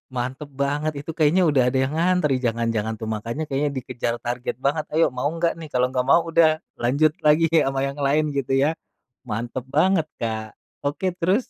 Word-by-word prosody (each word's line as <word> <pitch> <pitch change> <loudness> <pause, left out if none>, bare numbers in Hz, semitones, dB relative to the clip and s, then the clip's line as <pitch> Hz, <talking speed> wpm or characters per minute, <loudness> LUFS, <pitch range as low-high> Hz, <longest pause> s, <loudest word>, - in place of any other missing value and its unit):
Mantep 130 +4 -3
banget 150 +2 0
itu, 160 - -6
kayaknya 165 +4 +4
udah 135 -4 +3
ada 130 - 0
yang 135 +3 -2
ngantri 175 -4 +2
jangan-jangan, 115 -1 0
tuh. 110 -1 -4
Makanya 115 +8 -4
kayaknya 140 +1 0
dikejar 120 -2 -3
target 120 0 -3
banget, 150 +2 +1
"Ayo, 165 +1 +4
mau 125 - -1
enggak 165 0 0
nih?" 160 - -7
Kalau 125 0 +2
enggak 130 -1 -1
mau 170 - +6
udah, 160 -1 +4 0.2
lanjut 140 +6 +3 0.2
lagi 155 +2 +5
sama 135 -5 +2
yang 140 - -6
lain, 145 +2 +1
gitu, 135 -1 -1
ya? 160 +3 +1 0.5
Mantep 120 +4 -4
banget, 165 +1 +3 0.2
Kak. 110 -1 -3 0.3
Oke, 150 +6 0
terus? 190 +8 +1
140 Hz, 185 wpm, -23 LUFS, 125-160 Hz, 0.5 s, mau